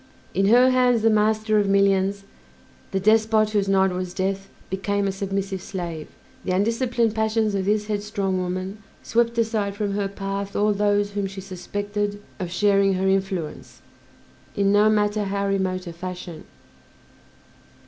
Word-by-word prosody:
In 195 +1 +2
her 250 +4 +6
hands 250 -3 +3
the 225 - +5
master 215 0 +2
of 200 -1 +1
millions, 195 0 +2 0.7
the 195 - -1
despot 215 +1 +3
whose 205 -2 +1
nod 190 -1 +3
was 180 0 -4
death, 195 +1 -2 0.2
became 200 +1 -1
a - - 0
submissive 195 -1 -3
slave; 170 -5 -5 0.4
the 185 - -1
undisciplined 230 +2 +1
passions 220 -1 +1
of 195 -1 -1
this 210 +1 +1
headstrong 205 -2 -2
woman 185 +3 -4 0.2
swept 235 0 +1
aside 220 -3 0
from 205 -1 -2
her 200 0 -1
path 195 0 -5
all 210 0 +2
those 205 0 +1
whom 200 -1 -2
she 195 0 -8
suspected 205 +2 -4 0.2
of 180 -3 -3
sharing 195 +2 +3
her 190 +1 0
influence, 190 -4 -2 0.7
in 200 -2 +2
no 205 +1 +5
matter 210 0 +1
how 200 0 -1
remote 190 -1 -1
a 170 - -7
fashion. 175 -2 -7
200 Hz, 150 wpm, -23 LUFS, 190-215 Hz, 0.7 s, her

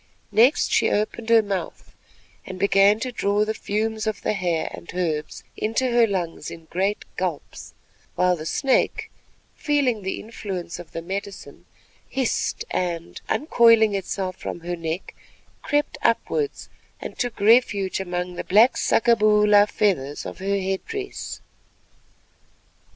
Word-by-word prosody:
Next 245 +7 +4
she - - +3
opened 220 +2 -2
her 230 -1 +6
mouth, 195 -2 -5 0.5
and 185 - -8
began 200 +2 +4
to 255 - -2
draw 205 -2 +1
the 220 - -1
fumes 220 +1 -2
of 215 - -3
the - - +1
hair 175 -5 -1
and - - -11
herbs 160 -4 -2
into 225 +4 0
her 235 -1 +4
lungs 175 -6 -3
in 165 -1 -10
great 195 +4 -1
gulps; 180 -5 -5 0.4
while 180 0 +3
the 155 -1 -7
snake, 270 - 0 0.4
feeling 275 -7 +1
the 190 0 -3
influence 190 -6 -6
of 170 -2 -11
the 165 - -5
medicine, 195 +2 -7 0.4
hissed 265 -3 -1
and, 170 -2 -3
uncoiling 230 -7 +4
itself 190 -1 -3
from - - -5
about 170 +1 -10
her 175 - -1
neck, 165 +1 -5 0.5
crept 295 +1 -1
upwards 435 -3 0 0.3
and - - -8
took 245 -4 -2
refuge 205 -3 +3
among 180 -1 -3
the - - -5
black 220 +6 +5
saccaboola 210 -3 +4
feathers 145 -9 0
of - - -7
her 200 +1 0
head 190 0 -2
dress. 410 -3 -6
200 Hz, 140 wpm, -23 LUFS, 180-225 Hz, 0.5 s, her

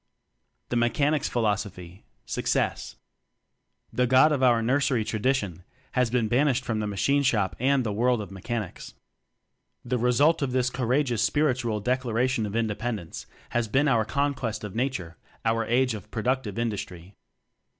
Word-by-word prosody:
The - - -2
Mechanic's 140 +5 +1
Philosophy 100 -5 -2 0.2
Success. - - -1 1.0
The 125 0 +2
"God" 130 +5 +6
of 145 -3 0
our 120 -3 +4
nursery 130 -2 +1
tradi 110 +5 +1
tion 90 -8 -5 0.3
has 125 -2 +1
been 120 -2 +1
banished 130 +2 +2
from 110 -2 -1
the 105 - -2
Ma 100 - -4
chine 140 +8 +2
Shop 110 -8 +1
and 135 +1 +2
the 110 -3 -2
world 120 +3 +2
of 100 -3 -7
Me 95 -1 -10
chanics. 115 -5 -5 0.9
The 125 0 -1
result 130 +8 +3
of 135 -3 -1
this 130 0 +1
courage 125 +2 0
ous 115 -3 0
spiritual 130 -7 +1
Declaration 125 -1 0
of 100 - -7
Indepen 115 +1 -1
dence 85 -5 -9 0.2
has 120 -1 0
been 135 +7 +2
our 115 -5 +3
"Conquest 135 -3 -2
of 105 -3 -6
Na 120 +4 +1
ture," 90 -10 -7 0.3
our 115 0 +1
Age 125 +1 +2
of 105 -5 -8
Productive 115 -2 -2
Indus 115 -4 -1
try. 90 +2 -11
120 Hz, 165 wpm, -26 LUFS, 110-130 Hz, 1.0 s, God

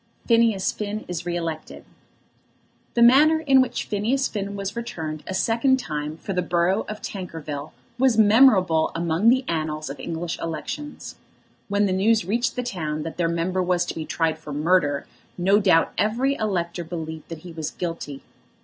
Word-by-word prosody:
PHINEAS 230 -4 +3
FINN 210 0 -5
IS 175 0 -5
RE 175 - -1
ELECTED. 165 -2 -5 1.1
The 235 - +2
manner 300 +6 +6
in 270 -4 +5
which 255 - -1
Phineas 230 +6 0
Finn 200 -1 -4
was 200 +1 -4
returned 160 -10 -5
a 190 - -3
second 235 +7 +2
time 150 - -4
for 195 - -5
the 180 - +1
borough 175 +3 +1
of 215 0 -7
Tankerville 160 -6 -6 0.3
was 260 -3 +3
memorable 205 -7 +5
among 170 +5 +2
the 260 +1 +3
annals 155 -3 -2
of 140 - -9
English 170 0 -4
elections. 250 - -6 0.5
When 205 0 +2
the 190 - 0
news 215 +3 +2
reached 235 +7 0
the 250 - -2
town 155 -9 -3
that 165 - -6
their 170 -2 +1
member 170 +3 0
was 180 -1 +1
to - - -4
be 160 -1 -6
tried 160 0 0
for 155 -2 -9
murder 145 -1 +1 0.3
no 195 +3 +4
doubt 180 -5 +3
every 240 +6 +1
elector 180 -8 -2
believed 160 -2 -7
that 165 -2 -7
he 175 - -8
was 160 -2 -4
guilty. 165 -5 -5
180 Hz, 170 wpm, -24 LUFS, 160-220 Hz, 1.1 s, manner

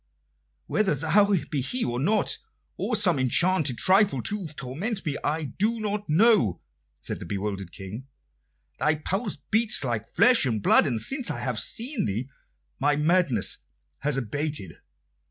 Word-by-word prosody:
"Whether 205 -8 +1
thou 200 +8 +3 0.2
be 145 -4 0
he 245 - -1
or 120 0 -2
not, 210 +10 +1 0.4
or 235 - -2
some 180 -8 +3
enchanted 140 +1 +2
trifle 190 - +3
to 205 -4 -3
torment 160 - -5
me, 145 -3 -1
I 155 +2 -1 0.2
do 225 +3 +1
not 210 -2 -3
know," 185 - +4 0.4
said - - -3
the - - -8
bewildered 100 -2 -4
King. 105 +7 -9 0.7
"Thy 150 +4 +2
pulse 195 +6 -3
beats 225 -3 +4
like 115 -4 -2
flesh 245 0 +4
and 110 -3 -1
blood, - - +5
and 120 -5 -1
since 265 - +1
I 120 - -3
have 120 -3 -1
seen 230 - -2
thee 110 +6 -3 0.5
my 145 +2 +2
madness 150 - +1 0.4
has 145 -1 +1
abated. 135 - -3
150 Hz, 150 wpm, -26 LUFS, 125-205 Hz, 0.7 s, blood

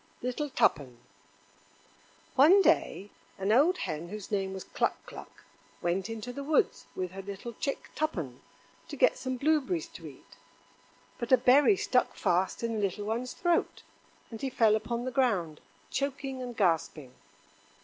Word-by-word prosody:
Little 255 +4 -2
Tuppen 135 - +1 1.4
One 335 +9 +7
day 200 - +1 0.3
an 195 +1 0
old 300 +11 +4
hen 160 +2 -4
whose 210 0 -8
name 195 -2 -1
was 190 -1 -6
Cluck - - -1
cluck - - -12 0.4
went 180 +4 -1
into 225 +2 -6
the 280 - -6
woods 300 0 +1
with 185 -2 -3
her 195 +1 -7
little 200 +4 -7
chick 275 +5 -4
Tuppen 165 - -3 0.5
to - - -7
get - - +4
some 260 -1 -4
blueberries 310 +4 +1
to - - -10
eat. - - -15 0.8
But 235 +1 -4
a 260 - +8
berry 285 +12 +5
stuck 250 -7 +1
fast 185 +5 0
in 230 -1 -1
the 220 - -2
little 200 +1 -2
one's 235 +4 -3
throat, 345 -1 0 0.5
and 225 - -8
he 270 - -1
fell 225 -4 +4
upon 235 +2 -3
the 255 - -2
ground, 200 - 0 0.3
choking 275 -1 -3
and 245 -2 -6
gasping. 160 - 0
235 Hz, 155 wpm, -29 LUFS, 190-270 Hz, 1.4 s, a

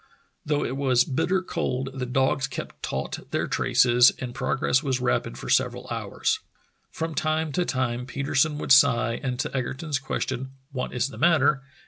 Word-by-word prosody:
Though 145 -1 0
it 130 - -3
was 130 -3 +3
bitter 185 +9 0
cold 135 -7 -2
the 130 -1 -4
dogs 135 +2 +1
kept 130 - -7
taut - - -3
their - - -1
traces 125 -1 +4
and 125 -2 -6
progress 130 0 +1
was 135 -4 -1
rapid 125 - -1
for - - -8
several - - +1
hours. - - -1 0.5
From 160 0 -4
time 155 0 0
to 175 +6 0
time 125 -3 -2
Petersen 140 +3 0
would 150 - -3
sigh, 120 -4 +5
and 125 -3 -2
to 130 - -3
Egerton's 135 +3 -2
question, 130 -1 -3 0.2
"What 125 -2 -3
is 125 +1 -1
the - - -10
matter?" 150 -4 +4
130 Hz, 165 wpm, -25 LUFS, 125-145 Hz, 0.5 s, sigh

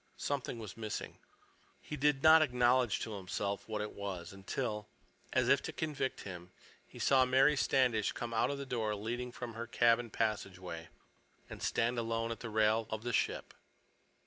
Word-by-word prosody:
Something 140 -4 -2
was 110 -5 -7
missing. 110 -2 -5 0.6
He 150 - -6
did 145 -1 +2
not 160 0 +9
acknowledge 125 -4 +3
to 110 - -4
himself 100 +2 -3
what 105 -1 -2
it 105 - -5
was 95 -4 -5
until, 105 +2 -3 0.4
as - - +2
if - - +5
to - - -5
convict 145 -4 -2
him, 90 -2 -8 0.4
he - - -14
saw 135 -1 +4
Mary 135 +3 +4
Standish 125 -6 +2
come 120 -1 -5
out 110 - +2
of 140 - -2
the 140 - -5
door 110 -5 -1
leading 120 +4 -4
from 120 -1 -6
her 115 +1 -5
cabin 120 0 +3
passageway, 95 -7 -3 0.6
and - - -8
stand 120 +1 +1
alone 115 0 -1
at 115 - -5
the 115 - -6
rail 110 0 +2
of 110 0 -4
the 120 0 -2
ship. - - 0
115 Hz, 175 wpm, -34 LUFS, 105-125 Hz, 0.6 s, not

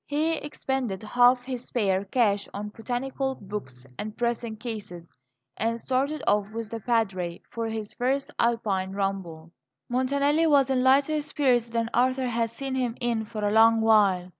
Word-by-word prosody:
He 310 +3 0
expended 265 -9 -3
half 245 +3 +4
his 250 -2 -5
spare 195 -4 0
cash 205 -2 +1
on 210 +1 -4
botanical 260 +4 -3
books 185 - -8
and 215 0 -5
pressing 235 -1 -1
cases, 210 -7 -7 0.4
and 230 +2 -1
started 275 +4 -1
off 205 -1 +2
with 225 0 -6
the 230 - -4
Padre 195 -7 -1
for 230 -1 -3
his 220 -2 -4
first 270 +3 -1
Alpine 205 -5 0
ramble. 190 -5 -3 0.4
Montanelli 280 +5 +2
was 275 -3 +4
in 255 -1 +2
lighter 280 +4 +3
spirits 260 -5 +1
than 230 0 -1
Arthur 255 +2 +2
had 230 -1 0
seen 270 +4 -5
him 250 -3 -1
in 235 -3 -1
for 215 -1 -3
a - - 0
long 225 +1 +6
while. 205 -5 +3
230 Hz, 160 wpm, -26 LUFS, 210-260 Hz, 0.4 s, long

